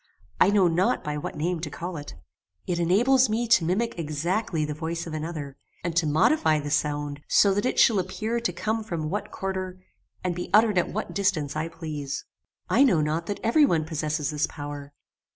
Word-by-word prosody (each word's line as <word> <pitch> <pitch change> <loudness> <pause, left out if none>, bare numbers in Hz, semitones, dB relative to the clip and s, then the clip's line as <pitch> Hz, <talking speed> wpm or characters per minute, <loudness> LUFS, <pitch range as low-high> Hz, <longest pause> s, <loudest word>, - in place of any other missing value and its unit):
I - - +6
know 200 -3 +4
not 185 +9 +1
by 150 -2 -3
what 150 - -6
name 170 +3 -1
to 165 - -4
call 175 +1 -6
it. 145 -1 -8 0.3
[*] 90 +1 -50
It 175 -1 -1
enables 240 +9 +4
me 230 +2 0
to 190 - +5
mimic 190 +5 -1
exactly 165 +2 -1
the 150 - -3
voice 165 +2 -4
of 165 - -7
another, 155 -3 -5 0.3
and 170 -2 -2
to 165 -2 +2
modify 155 - +3
the 145 0 -5
sound 145 -1 -1
so 200 -1 +5
that 205 +5 0
it - - -2
shall 220 -4 +5
appear 215 +6 -2
to 235 -5 -1
come 220 +5 -2
from 160 -6 -4
what 205 - -3
quarter, 185 -1 -4 0.4
and 180 -1 0
be 180 +1 -5
uttered 215 -3 +5
at - - -1
what - - -4
distance 180 -8 0
I 155 +1 -1
please. 155 -4 -5 0.4
"I - - +3
know 225 - +4
not 155 +3 -1
that 205 - -4
every 235 +7 +4
one 165 - +2
possesses 155 -2 -2
this 150 0 0
power. 145 -1 -7
170 Hz, 205 wpm, -26 LUFS, 150-200 Hz, 0.4 s, I